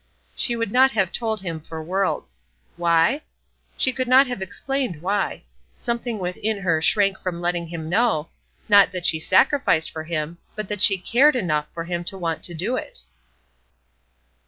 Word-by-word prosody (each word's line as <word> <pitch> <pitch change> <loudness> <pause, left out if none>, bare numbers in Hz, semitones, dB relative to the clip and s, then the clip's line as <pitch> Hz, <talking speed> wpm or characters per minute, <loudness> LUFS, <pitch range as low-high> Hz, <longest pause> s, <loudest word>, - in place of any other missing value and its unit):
She 240 - +1
would 230 -3 -2
not 260 +3 +5
have 195 -4 +1
told 220 -3 -2
him 165 -4 -4
for 160 0 -8
worlds. 185 - -2 0.3
Why? 170 - +2 0.6
She 260 - +2
could 255 -1 -2
not 260 +2 +6
have 245 -5 -5
explained 200 - -3
why. 200 +1 -1 0.3
Something 235 -1 -3
within 200 +3 -3
her 165 -4 +1
shrank 195 +2 +2
from 180 -2 -4
letting 175 -1 -1
him 160 -1 -6
know, 180 -4 +1 0.4
not 205 -2 +6
that 180 -2 -5
she 160 - +3
sacrificed 185 - +2
for 160 0 -6
him, 165 +1 -4 0.2
but 215 -1 -4
that 205 -2 -4
she 195 -2 +6
cared 260 +10 +3
enough 155 -10 0
for 165 - -5
him 175 0 -3
to 195 - -3
want 165 -3 -3
to 175 - -5
do 190 +10 -1
it! - - -6
190 Hz, 170 wpm, -23 LUFS, 170-230 Hz, 0.6 s, not